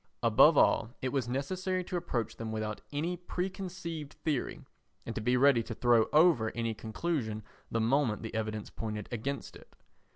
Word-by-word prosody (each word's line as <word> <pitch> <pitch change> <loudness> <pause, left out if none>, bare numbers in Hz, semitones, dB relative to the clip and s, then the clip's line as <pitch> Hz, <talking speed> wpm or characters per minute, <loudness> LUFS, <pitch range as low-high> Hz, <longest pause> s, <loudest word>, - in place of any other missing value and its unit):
Above - - +6
all, 110 - +4
it 130 - +1
was 130 -3 -1
necessary 185 +8 -1
to 180 - -5
approach 135 -10 -2
them 115 -1 -4
without 110 -1 -3
any 160 +5 -1
preconceived 180 -4 -5
theory 150 -6 -1 0.4
and 115 - -4
to 110 - -3
be 125 +3 +2
ready 135 -2 +5
to 115 0 -6
throw 120 -2 +4
over 150 -8 +5
any 115 -1 -1
conclusion 110 0 -3 0.3
the 115 - 0
moment 115 -2 +1
the 110 - -6
evidence 110 -1 -3
pointed 105 -2 -5
against 135 +4 -4
it. - - -16
125 Hz, 165 wpm, -31 LUFS, 110-165 Hz, 0.4 s, Above